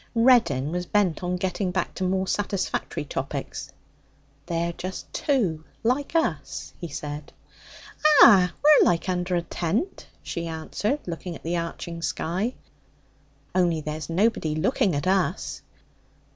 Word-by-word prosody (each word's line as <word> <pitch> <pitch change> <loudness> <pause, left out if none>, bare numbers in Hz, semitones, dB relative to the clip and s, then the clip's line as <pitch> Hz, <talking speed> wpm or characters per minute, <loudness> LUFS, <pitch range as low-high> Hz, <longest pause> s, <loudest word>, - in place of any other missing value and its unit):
Reddin 230 - +4
was 180 0 -3
bent 195 -6 +1
on 180 0 -1
getting 185 +1 -1
back 180 0 -2
to - - -4
more 190 +1 +1
satisfactory 200 0 -2
topics. - - -5 0.8
'They're 170 0 -1
just 185 +2 -7
two, 195 - 0 0.2
like 265 +7 0
us,' 150 - -1
he 170 - -3
said. 145 0 -6 0.9
'Ah! 185 -5 +7
We're 300 0 +8
like 170 +1 +1
under 180 0 0
a 170 - 0
tent,' 205 - -2 0.2
she 170 0 -4
answered, 205 - -2
looking 170 0 -5
at - - -12
the 170 +2 -1
arching 170 0 -5
sky. 185 +9 -2 1.0
'Only 175 -3 +2
there's 155 0 -5
nobody 165 -3 +1
looking 160 +2 +1
at 145 - -2
us.' 185 -2 0
180 Hz, 130 wpm, -25 LUFS, 165-200 Hz, 1.0 s, We're